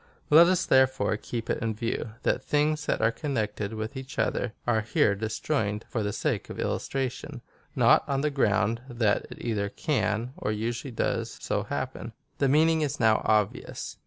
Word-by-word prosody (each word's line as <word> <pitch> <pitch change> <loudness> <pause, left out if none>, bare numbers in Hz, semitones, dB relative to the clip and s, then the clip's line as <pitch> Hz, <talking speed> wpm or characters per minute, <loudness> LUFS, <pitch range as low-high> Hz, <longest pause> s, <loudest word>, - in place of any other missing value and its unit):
Let 165 +3 +9
us 185 0 +2
therefore 130 -3 +3
keep 115 +1 -5
it - - -1
in 110 -2 -1
view, 115 0 -3
that - - +1
things 150 0 +1
that - - 0
are 115 - +4
connected 110 -7 -3
with 110 +4 -5
each 130 0 -8
other 120 - 0
are 110 -2 +2
here 110 -1 +2
disjoined 110 +1 -2
for 115 - -2
the 105 -1 -1
sake - - -2
of - - -7
illustration 135 0 -3 0.2
— - - -33
not - - +5
on 135 -1 +1
the 150 0 0
ground 110 -4 +1
that 115 -4 +1
it - - -10
either 105 -4 -1
can, 120 -2 -1
or 105 - -2
usually 115 +5 -3
does, 115 - -2
so - - -1
happen. - - -4 0.3
The 140 - +3
meaning 160 +3 +4
is 145 -1 -2
now 110 -2 +4
obvious. 105 -2 -1
120 Hz, 180 wpm, -27 LUFS, 110-140 Hz, 0.3 s, Let